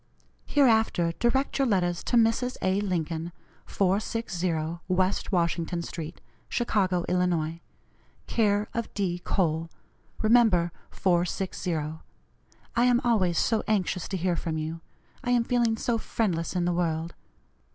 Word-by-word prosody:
Hereafter 220 Hz, -10 st, +3 dB
direct 265 Hz, +4 st, +1 dB
your 270 Hz, -, +3 dB
letters 175 Hz, -5 st, +1 dB
to -, -, 0 dB
Mrs. 230 Hz, +2 st, +2 dB
A. 190 Hz, +2 st, +2 dB
Lincoln, 170 Hz, -3 st, -2 dB, 0.4 s
460 180 Hz, -5 st, -1 dB
West 185 Hz, +2 st, 0 dB
Washington 170 Hz, -1 st, 0 dB
street, 165 Hz, 0 st, -7 dB, 0.3 s
Chicago, 190 Hz, -7 st, +1 dB
Ill., 170 Hz, -3 st, 0 dB, 0.7 s
care 210 Hz, -2 st, +1 dB
of 230 Hz, 0 st, -3 dB
D. 180 Hz, -4 st, -1 dB
Cole. 165 Hz, -3 st, 0 dB, 0.5 s
Remember 215 Hz, -7 st, +4 dB, 0.2 s
460. 180 Hz, 0 st, 0 dB, 1.0 s
I 240 Hz, +1 st, +4 dB
am 245 Hz, -1 st, +4 dB
always 190 Hz, -8 st, +2 dB
so 225 Hz, -2 st, +2 dB
anxious 185 Hz, -4 st, 0 dB
to 190 Hz, -, -3 dB
hear 180 Hz, 0 st, 0 dB
from 160 Hz, -1 st, -3 dB
you, 160 Hz, +1 st, -4 dB, 0.4 s
I 245 Hz, -, -2 dB
am 245 Hz, -1 st, +4 dB
feeling 235 Hz, -2 st, +1 dB
so 230 Hz, 0 st, 0 dB
friendless 185 Hz, -8 st, -1 dB
in 175 Hz, -1 st, +1 dB
the 175 Hz, -, +1 dB
world. 165 Hz, -1 st, -1 dB
185 Hz, 125 wpm, -27 LUFS, 170-225 Hz, 1.0 s, Remember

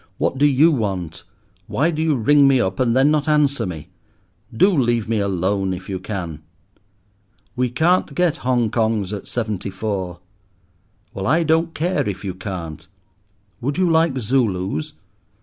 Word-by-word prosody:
What 135 Hz, -, -1 dB
do 145 Hz, -, +5 dB
you 145 Hz, +4 st, +4 dB
want? 90 Hz, -, -3 dB, 0.4 s
Why 160 Hz, +5 st, +1 dB
do 155 Hz, -1 st, -3 dB
you 160 Hz, -2 st, +2 dB
ring 140 Hz, +4 st, +4 dB
me 135 Hz, -2 st, +4 dB
up, 95 Hz, -5 st, -1 dB
and 125 Hz, -1 st, +2 dB
then 135 Hz, +3 st, +4 dB
not 150 Hz, -1 st, +1 dB
answer 150 Hz, -6 st, +2 dB
me? 80 Hz, -4 st, -7 dB, 0.6 s
Do 190 Hz, -, +3 dB
leave 120 Hz, -5 st, +1 dB
me 110 Hz, -1 st, 0 dB
alone, 95 Hz, 0 st, 0 dB
if 95 Hz, +1 st, -10 dB
you 95 Hz, -1 st, -3 dB
can!" 90 Hz, -5 st, -5 dB, 1.1 s
"We 125 Hz, 0 st, 0 dB
can't 165 Hz, +9 st, +1 dB
get 175 Hz, -3 st, +1 dB
Hong 120 Hz, -3 st, 0 dB
Kongs 110 Hz, -4 st, 0 dB
at 100 Hz, -, -9 dB
seventy 110 Hz, -5 st, -3 dB
four." 95 Hz, -3 st, -4 dB, 0.9 s
"Well, 95 Hz, -, -4 dB
I 160 Hz, +6 st, +3 dB
don't 160 Hz, +1 st, +1 dB
care 175 Hz, -, 0 dB
if 100 Hz, 0 st, -6 dB
you 95 Hz, -, -3 dB
can't." 90 Hz, -4 st, -7 dB, 0.7 s
"Would 140 Hz, +4 st, -2 dB
you 185 Hz, -1 st, +2 dB
like 160 Hz, -4 st, +2 dB
Zulus?" 100 Hz, -, -1 dB
115 Hz, 160 wpm, -21 LUFS, 95-145 Hz, 1.1 s, do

